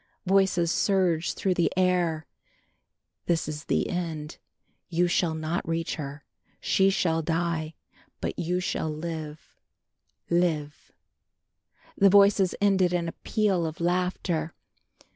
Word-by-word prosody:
Voices 190 -3 +3
surged 180 -5 +1
through 190 - +1
the 175 -1 +1
air. 175 -4 +1 1.0
"This 170 -2 +1
is 150 0 -6
the - - 0
end, 160 -4 -4 0.5
you 175 +1 +2
shall 175 -2 +1
not 160 +2 -3
reach 165 0 -1
her, 145 -1 -7 0.4
she 195 0 +3
shall 165 -4 +1
die, 165 -1 -2 0.4
but - - -4
you 180 +2 0
shall 175 -3 -2
live 155 -1 -7 0.7
live." 160 -4 -1 1.0
The 195 -1 +5
voices 200 -1 +5
ended 190 -3 +3
in 170 -1 0
a - - -3
peal 195 -6 +1
of 160 - -7
laughter. 175 -2 -1
170 Hz, 120 wpm, -27 LUFS, 160-185 Hz, 1.0 s, The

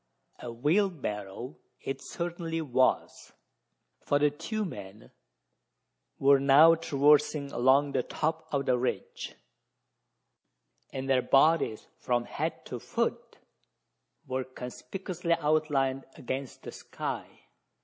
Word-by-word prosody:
A 120 - -6
wheelbarrow 130 - -1 0.2
it 135 - -5
certainly 170 -1 -4
was: 130 -4 0 0.7
for 145 - +2
the 145 0 +3
two 210 +9 -3
men 100 - -9 1.1
were 140 0 +5
now 145 +4 +7
traversing 150 -2 +2
along 135 +4 +3
the - - +1
top 160 +5 -2
of 140 -2 0
the 125 -1 +2
ridge, 125 - -3 1.6
and 135 0 -5
their 130 -2 +3
bodies 140 -4 +3
from 120 -1 0
head - - -4
to - - -6
foot, - - -3 0.9
were 130 0 -2
conspicuously 170 +8 -4
outlined 150 -4 +1
against 130 +1 -5
the - - -7
sky. - - -6
140 Hz, 105 wpm, -29 LUFS, 130-160 Hz, 1.6 s, now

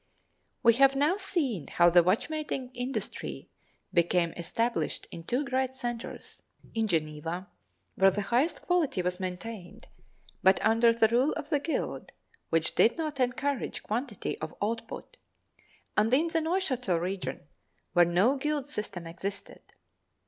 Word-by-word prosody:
We 235 -1 +7
have 275 0 +7
now 300 +7 +2
seen 290 - -1
how 175 0 +4
the 175 +1 +7
watchmaking 255 - -1
industry 250 +2 -4 0.4
became 170 0 +2
established 230 +8 -1
in 165 - -8
two 255 +9 0
great 260 -1 -1
centers—in 235 -2 -5
Geneva, 165 +1 -2 0.5
where 195 0 +5
the 205 +2 -2
highest 245 +11 +1
quality 325 - +1
was 180 +1 -1
maintained, 185 0 -6 0.6
but 190 +1 +5
under 230 +2 +5
the 230 -1 +4
rule 250 +6 +3
of 295 - -6
the 295 - +3
guild, 315 +3 -3 0.4
which 165 0 +1
did 235 - +4
not 305 -4 -3
encourage 270 +2 -1
quantity 230 0 -3
of 155 +1 -6
output, 230 - -4 0.8
and 215 +2 +3
in 305 +6 +3
the 325 0 +1
Neuchatel 275 - 0
region 175 -7 -3 0.5
where 175 -1 +7
no 190 +11 +3
guild 295 0 -1
system 210 - -5
existed. 190 +4 -6
230 Hz, 135 wpm, -29 LUFS, 180-275 Hz, 0.8 s, We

